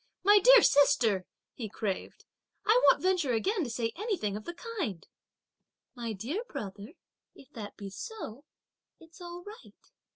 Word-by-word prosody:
"My 410 Hz, +2 st, +7 dB
dear -, -, +8 dB
sister," 240 Hz, -10 st, +4 dB, 0.3 s
he 225 Hz, -4 st, -6 dB
craved, 195 Hz, -2 st, -4 dB, 0.4 s
"I 460 Hz, +4 st, +5 dB
won't -, -, +5 dB
venture 360 Hz, -9 st, +2 dB
again 375 Hz, -, 0 dB
to 260 Hz, -, -4 dB
say 230 Hz, -1 st, -2 dB
anything 365 Hz, -, -2 dB
of 215 Hz, +1 st, -7 dB
the 345 Hz, -, -6 dB, 0.2 s
kind" 205 Hz, -, -3 dB, 0.9 s
"My 235 Hz, -3 st, -5 dB
dear 250 Hz, -, -4 dB
brother, 205 Hz, -, -7 dB, 0.4 s
if 275 Hz, +1 st, -17 dB
that 215 Hz, -6 st, -8 dB
be 200 Hz, -1 st, -7 dB
so, 285 Hz, -, -8 dB, 0.6 s
it's 330 Hz, +2 st, -17 dB
all 350 Hz, 0 st, -8 dB
right!" 430 Hz, +5 st, -14 dB
280 Hz, 150 wpm, -30 LUFS, -, 0.9 s, dear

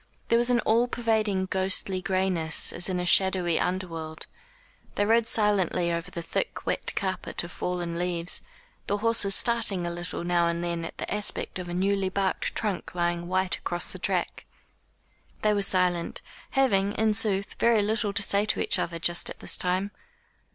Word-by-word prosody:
There 230 Hz, -, +4 dB
was 240 Hz, +1 st, +1 dB
an 240 Hz, -1 st, +3 dB
all 230 Hz, +3 st, +2 dB
pervading 220 Hz, -5 st, 0 dB
ghostly 190 Hz, 0 st, -1 dB
grayness 185 Hz, -4 st, +1 dB
as 175 Hz, +2 st, +1 dB
in 180 Hz, -1 st, -1 dB
a 180 Hz, -, -2 dB
shadowy 180 Hz, -2 st, +3 dB
under 185 Hz, +1 st, -1 dB
world. 160 Hz, -1 st, -7 dB, 0.7 s
They 205 Hz, -, +1 dB
rode 225 Hz, +1 st, +3 dB
silently 195 Hz, -6 st, +2 dB
over 170 Hz, +1 st, -3 dB
the 170 Hz, -2 st, -6 dB
thick -, -, -3 dB
wet -, -, -2 dB
carpet 190 Hz, -2 st, -3 dB
of 175 Hz, -, -8 dB
fallen 175 Hz, -2 st, -3 dB
leaves, 175 Hz, -1 st, -2 dB, 0.5 s
the 205 Hz, -, 0 dB
horses 210 Hz, -2 st, +3 dB
starting 220 Hz, -6 st, +2 dB
a 170 Hz, -, -2 dB
little 175 Hz, 0 st, -5 dB
now 175 Hz, -1 st, +2 dB
and 170 Hz, 0 st, -2 dB
then 170 Hz, -1 st, -3 dB
at -, -, -8 dB
the -, -, -4 dB
aspect 210 Hz, -2 st, -2 dB
of 180 Hz, -1 st, -6 dB
a -, -, -4 dB
newly 195 Hz, +1 st, +1 dB
barked 190 Hz, 0 st, -2 dB
trunk 200 Hz, -4 st, -2 dB
lying 175 Hz, 0 st, -1 dB
white 185 Hz, 0 st, 0 dB
across 175 Hz, 0 st, -2 dB
the -, -, -9 dB
track. -, -, -2 dB, 1.0 s
They 215 Hz, 0 st, +3 dB
were 205 Hz, -, 0 dB
silent, 180 Hz, -3 st, +1 dB, 0.3 s
having, 205 Hz, -7 st, +2 dB
in 220 Hz, 0 st, +1 dB
sooth, 200 Hz, -2 st, +2 dB
very 230 Hz, -3 st, +4 dB
little 215 Hz, 0 st, 0 dB
to 200 Hz, 0 st, -1 dB
say 200 Hz, +1 st, +2 dB
to -, -, 0 dB
each -, -, +1 dB
other 170 Hz, 0 st, -2 dB
just 170 Hz, +1 st, +2 dB
at -, -, -8 dB
this -, -, +4 dB
time. 185 Hz, +3 st, 0 dB
190 Hz, 180 wpm, -26 LUFS, 175-205 Hz, 1.0 s, There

